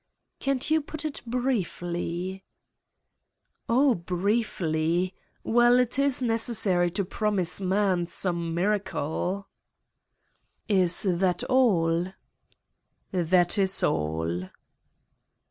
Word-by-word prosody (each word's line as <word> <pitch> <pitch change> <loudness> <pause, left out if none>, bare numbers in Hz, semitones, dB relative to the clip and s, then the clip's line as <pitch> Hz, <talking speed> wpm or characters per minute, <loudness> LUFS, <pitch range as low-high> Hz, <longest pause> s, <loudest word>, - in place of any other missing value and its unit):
"Can't 275 +1 -1
you 315 0 +3
put 310 +1 -6
it 305 - -3
briefly?" 190 -6 -3 1.3
"Oh, 260 +3 +4
briefly. 180 -3 -1 0.3
Well, 240 +1 +4
it 250 +1 +1
is 275 -2 +2
necessary 220 -6 +2
to 195 +3 -2
promise 195 -2 +1
man 190 -2 +1
some 170 -2 -1
miracle." 190 -1 -2 1.2
"Is 185 -4 +3
that 180 0 +1
all!" 180 -10 +2 1.0
"That 180 +2 +2
is 195 0 +2
all." 80 +4 -1
190 Hz, 85 wpm, -26 LUFS, 175-230 Hz, 1.3 s, Oh